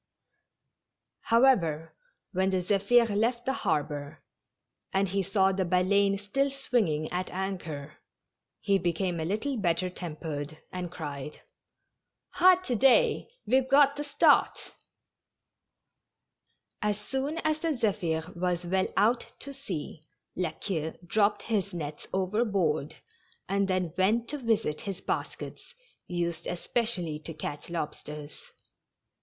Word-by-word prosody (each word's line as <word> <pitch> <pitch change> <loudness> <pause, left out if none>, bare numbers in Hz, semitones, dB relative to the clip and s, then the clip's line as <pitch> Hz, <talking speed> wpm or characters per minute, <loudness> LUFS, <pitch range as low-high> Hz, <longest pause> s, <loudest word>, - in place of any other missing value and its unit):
However, 190 - +3 0.4
when 190 +1 +2
the 185 -1 0
Zepliir 205 +5 +4
left 235 +3 +1
the 265 - +1
harbor, 150 - -2 0.7
and 195 +1 +2
he 195 +2 0
saw 195 0 +2
the 190 0 0
Ba 180 +1 +2
leine 200 +1 +3
still 240 +8 0
swinging 225 - 0
at 180 +1 -2
anchor, 170 -6 -5 0.6
he 200 -1 +2
became 175 0 -1
a 160 - -2
little 220 - -1
better 180 -2 0
tempered, 155 -3 -5
and 180 -2 -4
cried: 150 -4 -7 0.4
" - - -20
Ah, 365 +1 +8
to 250 - 0
day, 260 +3 +4 0.2
we've 260 +3 +2
got 280 0 +6
the 295 - -3
start 290 0 +3 2.1
I" 210 - +1
As 205 0 -1
soon 270 +8 -3
as 310 0 +1
the 315 -3 -1
Zephir 175 -6 -1
was 175 0 -1
well 190 +2 +1
out 230 +4 +2
to 280 - -5
sea. 185 - -6 0.3
La 180 -2 0
Queue 160 -3 -4
dropped 205 +3 +2
his 200 -4 -1
nets 150 -3 -6
overboard, 190 -6 0 0.5
and 200 +1 +1
then 185 -4 0
went 215 +6 +2
to 295 - -2
visit 225 - 0
his 195 -3 -5
baskets, 480 - -5 0.3
used 170 -1 -2
especially 175 -4 0
to 155 +1 -8
catch 150 0 -5
lobsters. 150 -2 -6
190 Hz, 125 wpm, -29 LUFS, 165-230 Hz, 2.1 s, Ah